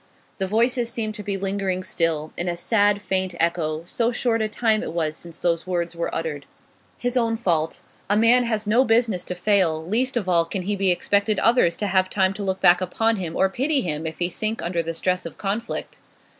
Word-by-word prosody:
The 190 - -1
voices 235 +3 +1
seemed 220 -2 -3
to 210 - -7
be 200 -1 -2
lingering 195 -1 -2
still, 165 -4 -1
in 175 - -3
a 170 -1 -1
sad, 205 +2 +3
faint 190 -3 -1
echo, 165 -2 0
so 230 +6 0
short 235 -2 0
a 215 - +1
time 220 0 +1
it - - -5
was 155 -2 -1
since 170 0 -9
those 170 0 -1
words 175 -2 -2
were 170 - -2
uttered. 150 -3 -4 0.5
His 245 +1 -2
own 230 -2 +1
fault. 165 -7 -1 0.3
A 205 - +3
man 240 +3 +5
has 220 -2 -1
no 225 +5 +4
business 225 -6 +2
to 180 - -4
fail; 180 -4 +1
least 245 +7 0
of 205 -6 -2
all 170 -2 +3
can 185 +2 -4
he 205 +3 -1 0.2
expect 200 +4 +1
others 215 -4 +3
to 210 - -2
have 185 -1 +2
time 190 -1 +1
to 200 +1 -5
look 190 -1 -1
back 175 0 +5
upon 225 +5 0
him 170 -4 -4
or 190 - +3
pity 270 +8 0
him 160 -2 -3
if 160 - -6
he 175 - 0
sink 215 +5 -3
under 170 0 -1
the 165 0 -4
stress 185 +2 0
of 165 - -8
conflict. 210 +4 -4
190 Hz, 215 wpm, -23 LUFS, 170-225 Hz, 0.5 s, man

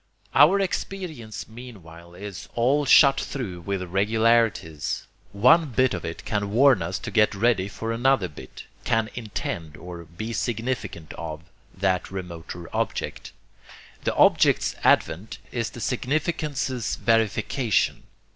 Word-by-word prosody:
Our 150 +10 +6
experience 165 - -4
meanwhile 90 -8 -12
is 100 +1 -8
all 135 +5 +2
shot 140 -1 +7
through 100 -11 -5
with 95 +1 -3
regularities. 105 -3 +1 0.3
One 130 +11 +5
bit 130 0 +2
of 90 - -4
it 80 - -6
can 100 -1 -1
warn 125 -1 +5
us 85 +3 -2
to - - -6
get 105 -2 +3
ready 100 -2 +2
for 115 +2 -5
another 120 -3 +2
bit, 75 - -11 0.2
can 115 -1 0
'intend' 85 -9 -5
or 85 -1 -9
be 100 +9 -6
'significant 115 -9 -3
of' 80 -2 -5 0.4
that 95 -1 0
remoter 85 -2 -7
object. - - -3 0.7
The - - -1
object's - - +4
advent 90 +7 +2
is 115 -2 -2
the - - -10
significance's 135 -2 -1
verification. 115 +1 +1
110 Hz, 125 wpm, -25 LUFS, 90-125 Hz, 0.7 s, shot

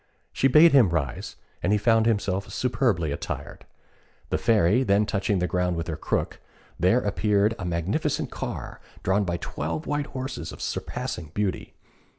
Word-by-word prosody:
She 135 - +3
bade 155 +5 +7
him 130 -9 +6
rise, 80 -5 -3 0.3
and 90 - +1
he 105 - +4
found 115 +1 +3
himself 100 -3 0
superbly 115 - 0
attired. 70 - -6 0.6
The - - +1
Fairy 105 +1 +3
then 105 -4 +3
touching 100 -1 0
the 90 - +1
ground 90 0 0
with 85 -1 -3
her 80 - -3
crook, 75 - -2 0.4
there 95 +8 +4
appeared 105 0 +1
a 90 - -4
magnificent 90 - -1
car, - - -6 0.2
drawn 100 +2 +2
by 85 -1 -1
twelve 80 -1 -4
white 145 0 -1
horses 130 0 -5
of - - -11
surpassing 80 -3 -4
beauty. 105 -2 -2
100 Hz, 160 wpm, -25 LUFS, 85-115 Hz, 0.6 s, bade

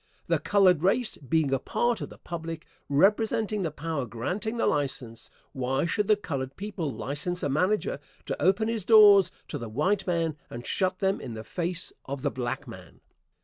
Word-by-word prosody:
The - - +1
colored 185 -6 +4
race 215 +6 +2
being 145 +1 +1
a 135 - +2
part 240 - 0
of - - -5
the - - -13
public, 165 -1 -6 0.2
representing 210 +6 +2
the 170 - 0
power 150 -3 -4
granting 185 - -3
the - - +1
license, 130 -5 -2 0.2
why 135 +2 0
should 205 +3 0
the 215 - +5
colored 135 -9 -4
people 195 -7 -4
license 150 +8 -3
a 145 - 0
manager 205 - +1 0.3
to - - -4
open 200 +4 +3
his 225 -3 -1
doors 205 -4 +7 0.2
to 145 - -4
the 115 -2 -6
white 185 - 0
man 165 -3 0
and 120 +1 -8
shut 185 -1 0
them 195 +1 0
in 115 - -6
the 110 - -6
face 175 +5 -3
of 140 0 -5
the 145 - +1
black 130 +2 -4
man? 95 -6 -12
165 Hz, 185 wpm, -27 LUFS, 135-200 Hz, 0.3 s, doors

